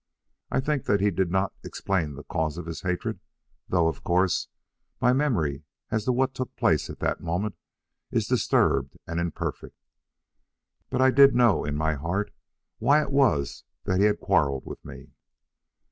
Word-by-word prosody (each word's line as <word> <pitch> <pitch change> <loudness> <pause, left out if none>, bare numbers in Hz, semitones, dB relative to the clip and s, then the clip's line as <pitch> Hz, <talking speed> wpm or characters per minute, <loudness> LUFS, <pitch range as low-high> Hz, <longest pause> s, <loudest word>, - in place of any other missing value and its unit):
I - - 0
think 145 -1 -1
that 100 - +2
he 100 +1 +2
did 95 0 0
not 95 +2 0
explain 85 -7 -2
the 70 - -9
cause 80 +1 -2
of 85 - -6
his 85 -1 -6
hatred, 90 -1 -2 0.5
though, 85 -3 +3
of 80 -4 -3
course, 90 +1 +1 0.5
my 125 - +4
memory 85 - 0 0.3
as 110 -1 -1
to - - +2
what 130 +1 +1
took 130 -2 -5
place - - +1
at - - -7
that - - -1
moment 90 +5 -2 0.5
is - - 0
disturbed 70 -1 +1
and 85 +1 -3
imperfect; 85 -2 -4 1.1
but 130 0 +1
I 130 - +6
did 140 0 +7
know 120 -4 +4
in 75 0 -2
my 80 +1 +1
heart 85 +8 -2 0.5
why 150 +2 +4
it - - -6
was 125 - +2 0.2
that 95 0 0
he 105 - +5
had 105 - 0
quarrelled 70 -9 +1
with - - -9
me." - - -11
95 Hz, 170 wpm, -26 LUFS, 80-125 Hz, 1.1 s, did